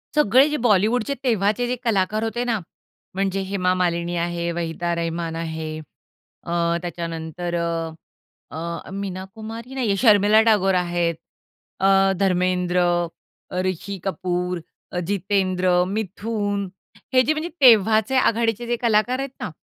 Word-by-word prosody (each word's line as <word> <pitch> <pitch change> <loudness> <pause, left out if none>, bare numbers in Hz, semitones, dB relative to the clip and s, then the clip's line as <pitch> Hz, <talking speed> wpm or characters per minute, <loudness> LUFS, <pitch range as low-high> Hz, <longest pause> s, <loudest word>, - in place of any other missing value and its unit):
सगळे 270 0 +5
जे 300 - -1
बॉलिवूडचे 225 +3 +2
तेव्हाचे 220 0 +1
जे 250 - -1
कलाकार 215 -1 +1
होते 240 +2 -2
ना, 230 -4 0 0.6
म्हणजे 195 0 0
हेमा 190 -1 0
मालिनी 175 -1 0
आहे, 170 0 -1
वहिदा 170 0 -2
रहमान 165 0 -3
आहे, 160 -1 -4 0.7
अ, 170 - -4 0.3
त्याच्यानंतर 170 0 -4
अ, 165 -1 -2 0.9
अ, - - -11
मीना 190 -2 -4
कुमारी 225 +3 -8
नाहीये. 225 -7 +1
शर्मिला 210 -1 +5
टागोर 200 -4 +3
आहेत, 175 -2 0 0.6
अ, 195 - +3 0.3
धर्मेंद्र, 180 -1 +1 0.7
अ, 180 - -2
ऋषी 185 +2 -3
कपूर, 180 -2 -2 0.3
अ, 180 - -2
जितेंद्र, 185 -2 +1
मिथून 205 0 -2 0.5
हे 255 - +6
जे 310 - +2
म्हणजे 315 +3 -3
तेव्हाचे 220 0 +5
आघाडीचे 230 -1 +1
जे 240 - +1
कलाकार 235 +3 +2
आहेत 275 0 -3
ना, - - -4
195 Hz, 130 wpm, -22 LUFS, 175-225 Hz, 0.9 s, हे